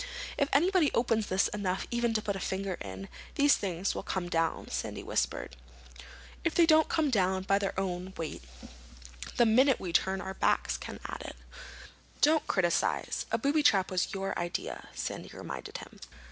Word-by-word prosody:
"If 280 -1 +1
anybody 345 +1 +4
opens 225 -3 +2
this 190 +1 +2
enough 190 -3 -2
even 235 -1 +1
to 215 - +1
put 200 -2 -1
a - - -4
finger 190 +1 -2
in, 95 0 -7 0.3
these 285 0 +5
things 185 -1 -2
will - - -4
come 180 -2 -3
down," 165 -1 0
Sandy - - -3
whispered. - - -2 0.9
"If 340 - 0
they 340 - +6
don't 315 -1 +5
come 305 -4 +1
down 190 -4 +2
by 195 +1 +2
their 195 -1 -2
own 185 0 -3
weight 160 -2 -4 1.0
the 240 - +6
minute 255 +4 +5
we 175 -3 -5
turn 190 +2 +2
our 190 0 -5
backs," - - +1
Ken - - -7
added. - - -7 0.8
"Don't 305 0 +4
criticize. 175 -3 0
A - - +3
booby 290 +2 +2
trap 195 -10 +4
was 185 -1 0
your 195 0 -3
idea," 175 0 -4
Sandy - - -4
reminded - - -6
him. - - -12
195 Hz, 170 wpm, -30 LUFS, 185-275 Hz, 1.0 s, they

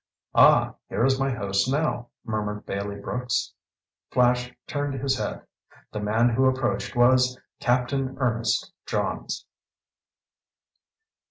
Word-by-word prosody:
"Ah, - - +6 0.2
here 120 - +1
is 135 0 +2
my 135 0 +1
host 100 -2 0
now," 140 -4 0 0.2
murmured 105 -2 -3
Bailey 100 +1 -3
Brooks. 125 +4 -2 0.6
Flash 125 0 +2
turned 145 -1 -2
his 135 0 0
head. - - -4 0.5
The 105 - -4
man 110 +3 +2
who 130 +3 +2
approached 130 -2 -1
was 125 +1 +4 0.2
Captain 130 +2 0
Ernest 115 -4 0
Johns. - - -2
125 Hz, 110 wpm, -25 LUFS, 110-130 Hz, 0.6 s, Ah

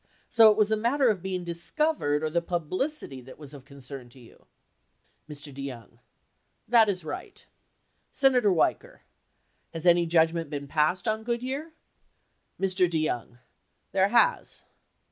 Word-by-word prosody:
So 225 -2 +8
it 210 - +2
was 215 0 +2
a - - +4
matter 240 +4 +2
of 200 -5 -1
being 185 -1 -4
discovered 170 - -1
or 155 - -1
the 170 +1 +1
publicity 175 - -3
that 130 +1 -13
was 150 -2 -11
of 140 -3 -12
concern 135 -2 -10
to 130 - -17
you? 120 - -19 0.8
Mr. 145 -1 -9
DeYoung. 130 -5 -9 0.7
That 225 -2 +5
is 185 -4 -3
right. - - -8 0.7
Senator 255 -6 +3
Weicker. 170 - 0 0.7
Has 165 +1 -4
any 175 -1 +4
judgment 165 -1 +2
been 140 -1 -5
passed 155 +5 0
on 220 0 0
Good 235 +1 -2
year? 285 +5 -5 0.9
Mr. 185 -2 +1
DeYoung. 155 -7 -2 0.5
There 195 0 +3
has. 235 +3 +1
175 Hz, 145 wpm, -27 LUFS, 145-220 Hz, 0.9 s, So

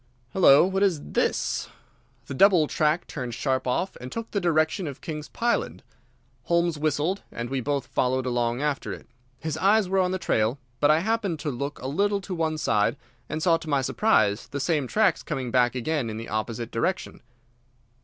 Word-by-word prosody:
Hullo, 170 -5 +7
what 190 +1 -1
is 180 -7 0
this?" - - 0 0.6
The - - -6
double 180 +2 +5
track 155 +3 +1
turned 125 -5 -5
sharp 130 0 -1
off 180 +10 -1
and 125 - -7
took 230 -1 -5
the 200 - -1
direction 160 +1 +1
of 140 -2 -7
King's 150 -2 -6
Pyland. 235 0 -1 0.6
Holmes 170 -2 +1
whistled, 155 +6 0
and 120 +2 -5
we 135 -1 -1
both 140 +1 -1
followed 130 0 0
along 120 +1 0
after 150 -2 -1
it. - - -10 0.3
His 155 +1 -4
eyes 200 +2 +4
were 190 +1 +1
on 185 -1 +2
the 185 - -1
trail, 115 -7 0 0.2
but 145 - +4
I 155 +2 +4
happened 210 -4 0
to 150 - -2
look 140 +3 -4
a - - -2
little 200 +8 +1
to 190 - -6
one 160 -2 -1
side, 105 -3 +1 0.3
and 155 +1 -3
saw 170 -3 +4
to 165 -1 -9
my 140 -2 +2
surprise 125 - +2
the 140 - -5
same 150 -2 0
tracks 210 - +2
coming 130 -3 -4
back 125 0 +3
again 130 -1 -1
in 110 - -5
the 115 - -7
opposite 110 +2 -3
direction. 115 - -2
150 Hz, 190 wpm, -26 LUFS, 130-180 Hz, 0.6 s, Hullo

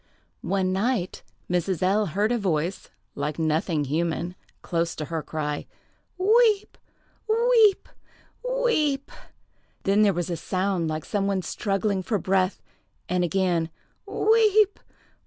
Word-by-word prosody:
One 185 0 0
night 195 -1 -1 0.3
Mrs. 180 0 -1
L—— 200 +3 +2
heard 205 +7 0
a 240 - +1
voice, 175 -2 -1 0.2
like 150 +1 -3
nothing 160 0 0
human, 165 +4 -1 0.3
close 170 -1 -1
to 155 - -4
her, 165 +1 -3
cry, 150 -1 -4 0.5
"Weep! 425 +2 +3 0.5
weep! 455 -2 +4 0.8
weep!" 300 - +1 0.7
Then 200 +2 +3
there 210 -1 +5
was 175 0 -3
a 170 - -2
sound 185 0 -1
like 155 -1 -3
some 200 -1 -1
one 195 -2 0
struggling 195 +3 -1
for 210 +3 -1
breath, 190 +1 0 0.4
and 180 0 +1
again 175 -2 +1 0.4
"Weep! 430 -2 +3
190 Hz, 120 wpm, -25 LUFS, 165-225 Hz, 0.8 s, there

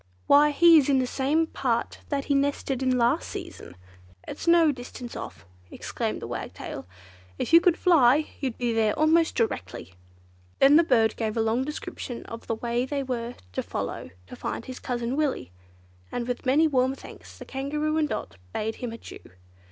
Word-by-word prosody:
"Why 290 +1 +6
he 330 +2 +7
is 285 - 0
in 275 - +4
the 260 - +2
same 285 +6 +1
part 250 -7 -2
that 280 -2 -1
he 285 - +1
nested 275 -1 0
in 255 -1 +2
last 235 0 +1
season. 90 - -8 0.5
It's - - -7
no 335 -2 +6
distance 245 -2 -8
off," 85 - -8 0.2
exclaimed - - -4
the - - -5
Wagtail. - - -6 0.5
"If - - -3
you 335 - +9
could 355 -1 +3
fly, 300 -4 +4
you'd 260 -4 -3
be 240 -2 -1
there 220 -2 +1
almost 320 +2 +3
directly!" 95 - -3 0.6
Then 275 +2 +6
the 330 - +7
bird 225 -7 +3
gave 220 -1 -2
a - - +2
long 225 +3 +1
description 265 -4 -6
of 230 0 -9
the 225 - -1
way 235 +2 -1
they 275 +1 -2
were 240 -2 -4 0.2
to - - -1
follow - - -5 0.2
to - - -10
find - - -5
his 255 -1 -8
cousin 240 0 -3
Willy, 290 - -1 0.6
and 240 -1 -3
with 245 +1 -4
many 290 +5 +4
warm 260 -2 +1
thanks - - -13
the - - -10
Kangaroo 300 +3 -2
and 300 -1 +1
Dot 95 +1 -5 0.2
bade 220 +1 -3
him 245 -2 -5
adieu. 230 - -10
260 Hz, 185 wpm, -26 LUFS, 235-295 Hz, 0.6 s, you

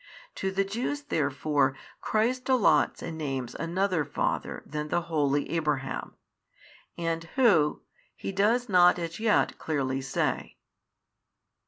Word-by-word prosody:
To 190 - -2
the 195 +1 +1
Jews 245 +9 -3
therefore 145 - 0 0.2
Christ 250 +4 0
allots 205 - +3
and 160 -1 -5
names 135 -5 -3
another 180 0 0
father 145 - -2
than 150 0 -4
the 175 - 0
holy 145 -4 0
Abraham, 150 -5 -2 0.8
and 165 -1 -2
who, 200 - +3 0.3
He - - -5
does 220 +6 +2
not 180 -2 +5
as 170 +1 -5
yet 220 -1 +2
clearly 135 -4 -1
say. 135 - -2
165 Hz, 120 wpm, -28 LUFS, 145-200 Hz, 0.8 s, not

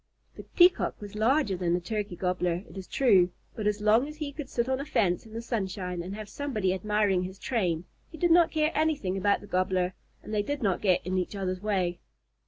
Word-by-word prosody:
The - - -8
Peacock 355 +1 +4
was 205 -1 -9
larger 220 0 +2
than 175 -1 0
the - - 0
Turkey 205 0 -3
Gobbler, 180 -1 -1
it - - -14
is 190 -1 -7
true, 195 -9 +4 0.3
but 215 -3 -2
as 210 0 0
long 220 +6 +4
as 300 - -8
he 300 -2 -4
could 280 -2 -7
sit 235 0 -1
on 260 0 0
a - - -2
fence 200 - 0
in 220 - -14
the 230 +1 -5
sunshine 190 -6 -3
and 185 +3 -6
have 215 -1 -7
somebody 215 -9 -1
admiring 205 -1 +1
his 185 +1 -6
train, 180 -8 -1 0.2
he 320 - -11
did 345 +1 +2
not 340 0 +6
care 310 0 +1
anything 300 -12 0
about 200 +1 +2
the - - -10
Gobbler, 185 0 0 0.3
and 215 - -7
they 210 - +2
did 285 +5 -3
not 190 -4 +1
get 185 -4 +2
in 185 +1 0
each 180 +3 -3
other's 185 -2 -3
way. 185 -4 0
205 Hz, 225 wpm, -28 LUFS, 185-250 Hz, 0.3 s, not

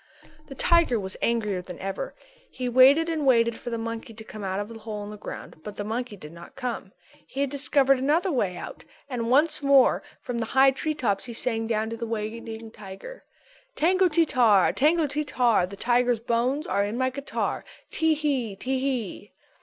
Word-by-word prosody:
_" 310 -1 -25
The 275 - -9
tiger 335 -7 +3
was 190 -1 -5
angrier 210 -5 0
than 180 -1 -9
ever. 195 - -5 0.3
He 255 - -4
waited 265 +6 +6
and 320 -2 -1
waited 235 -3 +4
for 240 - -7
the 230 - -2
monkey 230 0 -5
to 220 - -9
come 215 -1 -9
out 190 0 -2
of 205 - -3
the 230 0 -10
hole 215 -1 -6
in 205 - -7
the - - -7
ground 200 -5 -9
but 210 +2 -7
the 205 - -4
monkey 225 0 -4
did 150 -4 -10
not 170 0 -13
come. 245 -7 -4 0.4
He 275 - -4
had 280 -2 0
discovered 275 -1 +3
another 310 +8 +2
way 200 - 0
out - - -8 0.2
and 240 -4 -3
once 305 +4 +3
more 275 -2 +5 0.2
from 240 -1 -4
the 225 - -2
high 270 0 +7
tree 310 +3 -3
tops 205 -9 -1
he 240 - -7
sang 225 -1 -1
down 220 0 -1
to 230 - -4
the 230 - -4
waiting 225 0 -5
tiger: 210 - -10 0.5
"_Tango 365 +2 +3
ti 330 +1 +4
tar, 230 - +4
tango 315 +3 +3
ti 295 +1 -2
tar, 240 -10 +2
The 200 +2 -10
tiger's 245 +1 +2
bones 245 +6 0
are 200 - +1
in 205 +3 -3
my 260 0 +1
guitar. 280 +2 -3 0.3
Tee 320 -1 +2
hee, 270 -9 -1
Tee 260 +6 -2
hee. 245 -7 -3
240 Hz, 205 wpm, -26 LUFS, 215-280 Hz, 0.5 s, high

